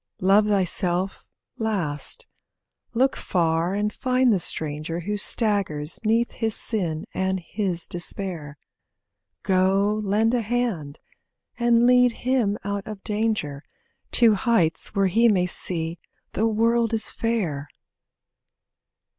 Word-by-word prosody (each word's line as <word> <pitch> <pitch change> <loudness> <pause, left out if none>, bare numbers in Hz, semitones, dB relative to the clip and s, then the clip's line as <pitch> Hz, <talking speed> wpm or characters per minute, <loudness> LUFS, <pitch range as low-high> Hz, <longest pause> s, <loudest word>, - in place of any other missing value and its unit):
Love 200 +3 +4
thyself 185 -1 0 0.3
last. 205 - -2 0.7
Look 265 +3 +2
far 170 +1 0
and 210 +1 -1
find 255 -2 +2
the 195 - +1
stranger 155 +1 -3
Who 205 +5 -3
staggers 200 -8 0
'neath 230 +2 +1
his 225 -2 -2
sin 170 -8 -1
and 190 0 -1
his 180 -1 -3
despair; 175 -4 -2 0.9
Go, 195 +3 +2
lend 215 +3 +1
a 245 - +2
hand, 215 -11 -2 0.6
and 235 0 +4
lead 250 0 +5
him 240 -6 0
out 200 -1 -4
of 210 -3 -8
danger, 210 -10 -2 0.5
To 230 -3 +6
heights 205 -6 +1
where 195 -1 +3
he 225 +6 +4
may 185 -4 +2
see 170 -2 -1 0.3
the 220 - +1
world 230 +1 +2
is 220 - +2
fair. 175 -12 -2
200 Hz, 115 wpm, -24 LUFS, 175-225 Hz, 0.9 s, To